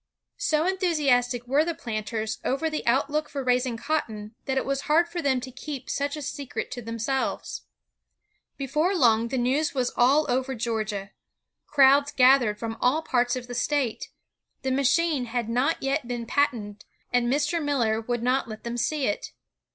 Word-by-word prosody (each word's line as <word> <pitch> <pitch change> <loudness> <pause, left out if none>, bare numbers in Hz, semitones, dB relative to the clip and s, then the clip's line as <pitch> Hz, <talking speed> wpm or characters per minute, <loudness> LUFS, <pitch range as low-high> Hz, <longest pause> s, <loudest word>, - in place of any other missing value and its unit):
So 310 +1 +1
enthusiastic 285 - +1
were 275 +5 +3
the 335 0 -2
planters 220 -2 -3
over 315 +5 0
the 310 - -3
outlook 290 +5 +1
for 280 -2 -4
raising 250 -1 +1
cotton, 225 -7 -3
that 265 0 -1
it - - 0
was 275 +2 -3
hard 330 +3 +4
for 345 0 -4
them 270 -3 +2
to 255 - -7
keep 270 0 -6
such 285 +1 -2
a 300 - -6
secret 275 0 -5
to 245 - -5
themselves. 230 +4 -3 0.9
Before 305 +7 0
long 230 -7 +4
the 260 - -2
news 275 +6 +1
was 255 -2 0
all 275 +5 +4
over 260 +1 0
Georgia. 215 -4 -3 0.6
Crowds 280 0 +5
gathered 255 -5 +5
from 225 0 -5
all 295 +6 +2
parts 245 -3 +1
of 250 -1 -5
the 245 - -8
state. 250 -1 -1 0.5
The 265 - 0
machine 280 +1 +2
had 240 -1 -2
not 255 +8 0
yet 270 -1 0
been 240 -1 -3
patented, 225 -6 -1 0.3
and 245 0 +2
Mr. 300 +4 +1
Miller 235 -7 +1
would 240 +1 -2
not 255 0 +1
let 215 -1 -8
them 235 0 -4
see 290 +3 0
it. 205 - -2
260 Hz, 170 wpm, -26 LUFS, 235-290 Hz, 0.9 s, Crowds